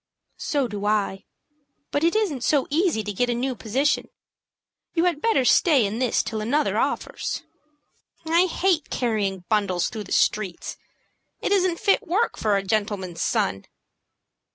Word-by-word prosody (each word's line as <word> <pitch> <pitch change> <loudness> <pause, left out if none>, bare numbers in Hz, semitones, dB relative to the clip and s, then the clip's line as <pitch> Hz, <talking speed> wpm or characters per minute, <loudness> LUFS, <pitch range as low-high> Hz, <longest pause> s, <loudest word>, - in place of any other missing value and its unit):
"So 280 -4 0
do 205 -3 -6
I; 205 -2 0 0.7
but 290 - 0
it 335 +4 +3
isn't 350 - 0
so 285 -1 +2
easy 320 - +1
to 205 0 -4
get 245 +5 0
a 240 - +1
new 255 +2 -1
position. 255 +6 0 0.9
You 335 - +3
had 345 -5 +1
better 445 - +2
stay 280 - +4
in 210 +3 -3
this 250 -3 +1
till 220 -2 -4
another 280 +8 +1
offers." - - -2 0.8
"I 335 +3 +3
hate 355 -3 0
carrying 205 -6 -1
bundles 200 -5 +1
through 215 -3 -6
the - - -13
streets. 195 -5 0 0.6
It - - -2
isn't 370 -4 +2
fit 395 - +3
work 405 +8 +1
for 210 -2 +1
a 195 - -2
gentleman's 195 -4 -2
son." 95 +1 0
245 Hz, 155 wpm, -24 LUFS, 205-325 Hz, 0.9 s, stay